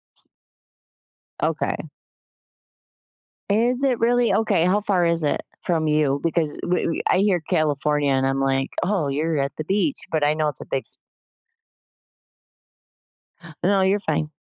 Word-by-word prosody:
S -, -, -4 dB, 1.2 s
Okay. -, -, 0 dB, 1.7 s
Is 240 Hz, +5 st, +2 dB
it 260 Hz, -4 st, +1 dB
really 240 Hz, +1 st, +2 dB
okay. 215 Hz, -6 st, +2 dB
How 195 Hz, +3 st, +2 dB
far 190 Hz, -4 st, +1 dB
is 170 Hz, -1 st, +2 dB
it 145 Hz, -, 0 dB, 0.2 s
from 160 Hz, -3 st, 0 dB
you? 150 Hz, -2 st, +1 dB
Because 165 Hz, -3 st, 0 dB
we 180 Hz, +1 st, 0 dB
we 165 Hz, -, -2 dB
I -, -, +4 dB
hear 195 Hz, -3 st, +2 dB
California 150 Hz, -3 st, 0 dB
and 135 Hz, 0 st, +1 dB
I'm 135 Hz, 0 st, 0 dB
like, 135 Hz, 0 st, 0 dB
"Oh, 185 Hz, -6 st, 0 dB
you're 155 Hz, +3 st, -1 dB
at 140 Hz, 0 st, -2 dB
the 155 Hz, -, -3 dB
beach" 205 Hz, -, 0 dB
but 160 Hz, -2 st, 0 dB
I 145 Hz, +1 st, +3 dB
know 155 Hz, 0 st, 0 dB
it's 145 Hz, -, -5 dB
a -, -, -8 dB
big 135 Hz, -, -2 dB
s -, -, +2 dB, 2.7 s
No, 195 Hz, +1 st, +3 dB
you're 195 Hz, +2 st, +2 dB
fine. 155 Hz, -4 st, -1 dB
165 Hz, 150 wpm, -22 LUFS, 150-200 Hz, 2.7 s, I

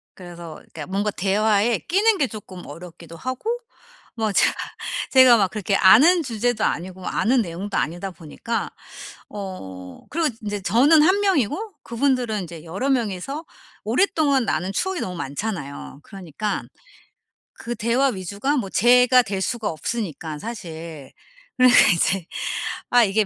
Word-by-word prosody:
그래서 170 Hz, -3 st, -10 dB
그러니까 155 Hz, 0 st, -10 dB
뭔가 200 Hz, +2 st, -1 dB
대화에 210 Hz, +4 st, +1 dB
끼는 410 Hz, +4 st, +2 dB
게 275 Hz, -7 st, +1 dB
쪼끔 190 Hz, -5 st, -10 dB
어렵기도 165 Hz, +1 st, -11 dB
하고 255 Hz, -, -4 dB, 0.7 s
뭐 220 Hz, -2 st, -1 dB
제가 -, -, +4 dB, 0.6 s
제가 255 Hz, -3 st, +7 dB
막 195 Hz, -3 st, +2 dB
그렇게 205 Hz, -2 st, -1 dB
아는 320 Hz, -, +6 dB
주제도 240 Hz, -3 st, -1 dB
아니고 185 Hz, +2 st, -3 dB
아는 250 Hz, +2 st, +2 dB
내용도 195 Hz, +1 st, -4 dB
아니다 175 Hz, +4 st, -2 dB
보니까. 180 Hz, +8 st, -5 dB, 0.6 s
어 95 Hz, -, -8 dB
그리고 325 Hz, 0 st, 0 dB, 0.2 s
인제 205 Hz, -1 st, -3 dB
저는 280 Hz, -, +5 dB
1 375 Hz, +4 st, +4 dB
명이고 380 Hz, -, 0 dB
그분들은 240 Hz, -3 st, 0 dB
인제 165 Hz, -2 st, -10 dB
여러 195 Hz, +12 st, -3 dB
명이서 250 Hz, -, -2 dB, 0.4 s
오랫동안 280 Hz, -, +2 dB
나눈 185 Hz, +2 st, -1 dB
추억이 380 Hz, -, -1 dB
너무 180 Hz, -1 st, -4 dB
많잖아요. 145 Hz, -3 st, -5 dB
그러니까 195 Hz, +1 st, -5 dB, 0.9 s
그 240 Hz, +1 st, -6 dB
대화 235 Hz, +5 st, +1 dB
위주가 200 Hz, -, -2 dB
뭐 200 Hz, -7 st, -2 dB
제가 250 Hz, +3 st, +5 dB
될 195 Hz, -3 st, -3 dB
수가 225 Hz, +1 st, -2 dB
없으니까 160 Hz, -4 st, -4 dB
사실. 165 Hz, -, -8 dB, 0.5 s
그러니까 255 Hz, -1 st, +7 dB
이제 180 Hz, +1 st, +1 dB, 0.6 s
아 245 Hz, -1 st, +5 dB
이게 210 Hz, +1 st, +2 dB
210 Hz, 305 characters per minute, -22 LUFS, 180-250 Hz, 0.9 s, 제가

